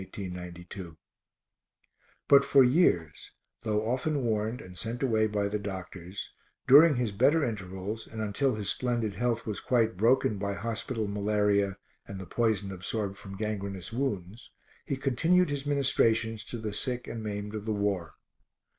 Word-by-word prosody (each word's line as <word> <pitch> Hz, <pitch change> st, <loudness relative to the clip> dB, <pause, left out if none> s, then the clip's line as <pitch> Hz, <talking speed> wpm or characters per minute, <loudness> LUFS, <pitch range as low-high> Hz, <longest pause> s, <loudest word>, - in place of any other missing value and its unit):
_ 90 Hz, -2 st, -7 dB, 1.3 s
_But 140 Hz, 0 st, +7 dB
for 140 Hz, -1 st, +6 dB
years, 125 Hz, -, +2 dB, 0.3 s
though 110 Hz, -1 st, 0 dB
often 135 Hz, +3 st, 0 dB
warned 110 Hz, +1 st, 0 dB
and 90 Hz, 0 st, -11 dB
sent 115 Hz, +7 st, -4 dB
away 110 Hz, -4 st, +3 dB
by 105 Hz, -1 st, 0 dB
the 105 Hz, +1 st, -2 dB
doctors, 95 Hz, -2 st, -7 dB, 0.3 s
during 150 Hz, +3 st, +8 dB
his 120 Hz, -3 st, 0 dB
better 140 Hz, +10 st, +3 dB
intervals 100 Hz, 0 st, -5 dB
and 110 Hz, -, -8 dB
until 110 Hz, +5 st, 0 dB
his 105 Hz, -2 st, -4 dB
splendid 120 Hz, -4 st, -1 dB
health 115 Hz, +2 st, -1 dB
was 105 Hz, -2 st, -3 dB
quite 115 Hz, -5 st, +1 dB
broken 110 Hz, -1 st, +3 dB
by 100 Hz, 0 st, -2 dB
hospital 115 Hz, +1 st, -3 dB
malaria 100 Hz, -1 st, +1 dB, 0.3 s
and 100 Hz, -1 st, -7 dB
the 95 Hz, -, -7 dB
poison 105 Hz, 0 st, 0 dB
absorbed 100 Hz, +2 st, -3 dB
from 95 Hz, -1 st, -9 dB
gangrenous 100 Hz, -2 st, -4 dB
wounds, 115 Hz, -4 st, -3 dB, 0.4 s
he 140 Hz, -, -2 dB
continued 160 Hz, +6 st, +2 dB
his 140 Hz, 0 st, -3 dB
ministrations 115 Hz, -6 st, +2 dB
to 120 Hz, -, -6 dB
the 110 Hz, -2 st, -4 dB
sick 125 Hz, +3 st, -3 dB
and 115 Hz, -1 st, -5 dB
the 105 Hz, -, -3 dB
maimed 105 Hz, 0 st, -5 dB
of 105 Hz, -1 st, -5 dB
the 110 Hz, -, -1 dB
war. 100 Hz, -5 st, -1 dB
110 Hz, 155 wpm, -29 LUFS, 100-120 Hz, 1.3 s, during